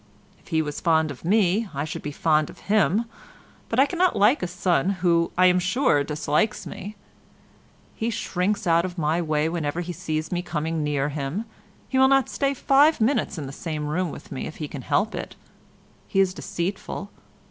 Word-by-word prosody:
If -, -, -25 dB
he 160 Hz, -2 st, +1 dB
was 150 Hz, -1 st, -5 dB
fond 160 Hz, -2 st, +2 dB
of 135 Hz, -, -11 dB
me 200 Hz, +3 st, +2 dB
I 140 Hz, +2 st, -1 dB
should 155 Hz, -, -5 dB
be 150 Hz, -, -5 dB
fond 155 Hz, 0 st, +2 dB
of -, -, -13 dB
him, 215 Hz, +1 st, +3 dB, 0.6 s
but 230 Hz, -, 0 dB
I 270 Hz, -, +7 dB
cannot 355 Hz, +3 st, +1 dB
like 215 Hz, +8 st, +4 dB
a 180 Hz, -, -1 dB
son 180 Hz, -2 st, +1 dB, 0.2 s
who, 170 Hz, -1 st, +3 dB
I 185 Hz, -, +6 dB
am 180 Hz, 0 st, +5 dB
sure, 185 Hz, -, +2 dB
dislikes 150 Hz, +7 st, 0 dB
me. 205 Hz, +3 st, -7 dB, 1.0 s
He 225 Hz, -, -2 dB
shrinks 205 Hz, -1 st, -1 dB
out 170 Hz, -1 st, +4 dB
of 185 Hz, 0 st, -5 dB
my 160 Hz, +1 st, +1 dB
way 155 Hz, -1 st, 0 dB
whenever 165 Hz, 0 st, -2 dB
he 175 Hz, 0 st, -5 dB
sees 155 Hz, 0 st, -3 dB
me 175 Hz, -1 st, 0 dB
coming 160 Hz, -2 st, -2 dB
near 145 Hz, -1 st, 0 dB
him. 150 Hz, +9 st, -3 dB, 0.4 s
He 260 Hz, -, 0 dB
will 265 Hz, -, +7 dB
not 270 Hz, -1 st, +3 dB
stay 275 Hz, -1 st, 0 dB
five 285 Hz, +4 st, +4 dB
minutes 225 Hz, -3 st, +1 dB
in 150 Hz, -, -4 dB
the 135 Hz, -, -6 dB
same 155 Hz, -1 st, -4 dB
room 170 Hz, +4 st, -1 dB
with -, -, -10 dB
me -, -, -4 dB
if 155 Hz, -, -8 dB
he 150 Hz, -, -5 dB
can 140 Hz, -2 st, -7 dB
help 145 Hz, -, 0 dB
it. -, -, -6 dB, 0.7 s
He 195 Hz, -, 0 dB
is 190 Hz, -1 st, +3 dB
deceitful. 190 Hz, +2 st, -4 dB
175 Hz, 195 wpm, -24 LUFS, 155-210 Hz, 1.0 s, I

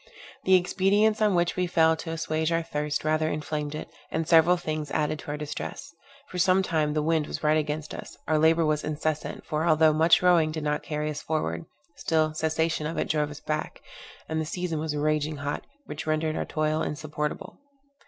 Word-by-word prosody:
The 190 Hz, -, +6 dB
expedients 200 Hz, +4 st, +2 dB
on 210 Hz, -3 st, +3 dB
which 175 Hz, 0 st, +1 dB
we 180 Hz, -1 st, 0 dB
fell 160 Hz, -2 st, +4 dB
to 160 Hz, -, -7 dB
assuage 160 Hz, 0 st, -1 dB
our 165 Hz, 0 st, +1 dB
thirst 150 Hz, -2 st, -2 dB
rather 155 Hz, 0 st, +2 dB
inflamed 150 Hz, -1 st, -3 dB
it, 155 Hz, -, -6 dB, 0.2 s
and 160 Hz, 0 st, -2 dB
several 170 Hz, +2 st, +6 dB
things 155 Hz, -3 st, -4 dB
added 150 Hz, +1 st, -1 dB
to -, -, -11 dB
our 150 Hz, -, -2 dB
distress. 150 Hz, +2 st, -6 dB, 0.4 s
For 180 Hz, -, -4 dB
some 185 Hz, +1 st, +4 dB
time 155 Hz, -4 st, 0 dB
the 150 Hz, -, +1 dB
wind 160 Hz, -1 st, +1 dB
was -, -, -5 dB
right 155 Hz, 0 st, +4 dB
against 150 Hz, 0 st, -2 dB
us; -, -, -9 dB
our 155 Hz, -1 st, +2 dB
labour 160 Hz, +1 st, +4 dB
was 155 Hz, -1 st, +1 dB
incessant, 155 Hz, 0 st, -3 dB
for, 155 Hz, +1 st, -1 dB
although 155 Hz, -1 st, +5 dB
much 165 Hz, +3 st, +4 dB
rowing 170 Hz, -3 st, +4 dB
did 155 Hz, -1 st, -4 dB
not 150 Hz, 0 st, 0 dB
carry 150 Hz, 0 st, -3 dB
us 150 Hz, -, -6 dB
forward, 85 Hz, -, -2 dB, 0.3 s
still, 155 Hz, -1 st, +1 dB
cessation 160 Hz, 0 st, 0 dB
of 165 Hz, -, -5 dB
it -, -, -1 dB
drove 150 Hz, -1 st, +1 dB
us 145 Hz, 0 st, -9 dB
back; 155 Hz, 0 st, -4 dB, 0.4 s
and 160 Hz, 0 st, -1 dB
the -, -, -3 dB
season 170 Hz, 0 st, -3 dB
was 155 Hz, -1 st, -2 dB
raging 150 Hz, +1 st, 0 dB
hot, 145 Hz, +1 st, -4 dB, 0.2 s
which -, -, -7 dB
rendered 155 Hz, 0 st, 0 dB
our -, -, -2 dB
toil 155 Hz, 0 st, 0 dB
insupportable. 150 Hz, 0 st, -4 dB
155 Hz, 200 wpm, -27 LUFS, 150-165 Hz, 0.4 s, The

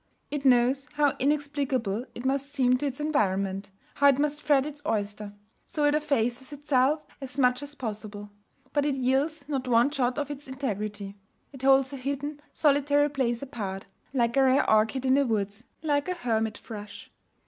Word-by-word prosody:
It 290 Hz, -1 st, -3 dB
knows 260 Hz, +2 st, +4 dB
how 290 Hz, -2 st, +2 dB
inexplicable 275 Hz, -6 st, 0 dB
it 240 Hz, -, -7 dB
must 275 Hz, +1 st, 0 dB
seem 255 Hz, -3 st, +3 dB
to 290 Hz, -, -1 dB
its 265 Hz, 0 st, -4 dB
environment, 195 Hz, -9 st, 0 dB, 0.2 s
how 285 Hz, -, +4 dB
it 275 Hz, -2 st, +5 dB
must 295 Hz, +1 st, 0 dB
fret 285 Hz, -3 st, +3 dB
its 295 Hz, -1 st, -7 dB
oyster; 205 Hz, -4 st, -2 dB, 0.4 s
so 300 Hz, -, -2 dB
it 290 Hz, -, +4 dB
effaces 265 Hz, -4 st, 0 dB
itself 290 Hz, +1 st, +1 dB, 0.2 s
as 265 Hz, -1 st, -5 dB
much 250 Hz, -1 st, +3 dB
as 290 Hz, 0 st, -9 dB
possible. 210 Hz, -4 st, -6 dB, 0.4 s
But 290 Hz, 0 st, +2 dB
it 285 Hz, -, +1 dB
yields 275 Hz, +3 st, 0 dB
not 270 Hz, -3 st, -2 dB
one 240 Hz, +3 st, +4 dB
jot 255 Hz, -3 st, 0 dB
of 290 Hz, -1 st, -2 dB
its 290 Hz, -1 st, -8 dB
integrity. 210 Hz, -6 st, -4 dB, 0.4 s
It 270 Hz, -, -10 dB
holds 270 Hz, 0 st, +4 dB
a -, -, -4 dB
hidden, 280 Hz, +3 st, -4 dB
solitary 290 Hz, 0 st, +3 dB
place 250 Hz, -3 st, -1 dB
apart 200 Hz, -8 st, -5 dB, 0.3 s
like 235 Hz, -3 st, +1 dB
a 275 Hz, -, +5 dB
rare 265 Hz, +1 st, +4 dB
orchid 220 Hz, +5 st, +2 dB
in 260 Hz, -, +4 dB
the 280 Hz, 0 st, +3 dB
woods, 205 Hz, 0 st, -2 dB, 0.2 s
like 290 Hz, +1 st, +1 dB
a 365 Hz, -, -1 dB
hermit 225 Hz, -8 st, -1 dB
thrush. 210 Hz, -2 st, -9 dB
265 Hz, 175 wpm, -27 LUFS, 230-285 Hz, 0.4 s, it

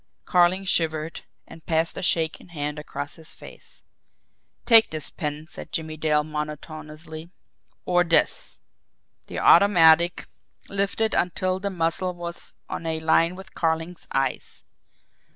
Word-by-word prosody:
Carling 180 Hz, +1 st, +3 dB
shivered, 160 Hz, -3 st, 0 dB, 0.2 s
and 165 Hz, -, -14 dB
passed 160 Hz, 0 st, +1 dB
a -, -, -5 dB
shaking 165 Hz, -2 st, 0 dB
hand 150 Hz, -3 st, -4 dB
across 145 Hz, -1 st, -6 dB
his 160 Hz, -1 st, -5 dB
face. -, -, -12 dB, 0.8 s
"Take 225 Hz, -2 st, +7 dB
this 155 Hz, -2 st, -6 dB
pen," 150 Hz, 0 st, -4 dB
said -, -, -8 dB
Jimmie 160 Hz, -1 st, -3 dB
Dale 150 Hz, -1 st, +1 dB
monotonously; 155 Hz, +1 st, -7 dB, 0.6 s
"or 175 Hz, -1 st, +3 dB
THIS!" 165 Hz, -1 st, +2 dB, 0.7 s
The -, -, -6 dB
automatic 170 Hz, -3 st, +5 dB, 0.4 s
lifted 200 Hz, +3 st, 0 dB
until 185 Hz, +1 st, 0 dB
the 200 Hz, +1 st, -2 dB
muzzle 180 Hz, 0 st, -1 dB
was 170 Hz, 0 st, -8 dB
on 165 Hz, -, -5 dB
a 160 Hz, 0 st, -1 dB
line 165 Hz, +2 st, +3 dB
with 190 Hz, 0 st, -12 dB
Carling's 165 Hz, +1 st, -2 dB
eyes. 135 Hz, -1 st, -2 dB
165 Hz, 125 wpm, -25 LUFS, 155-180 Hz, 0.8 s, Take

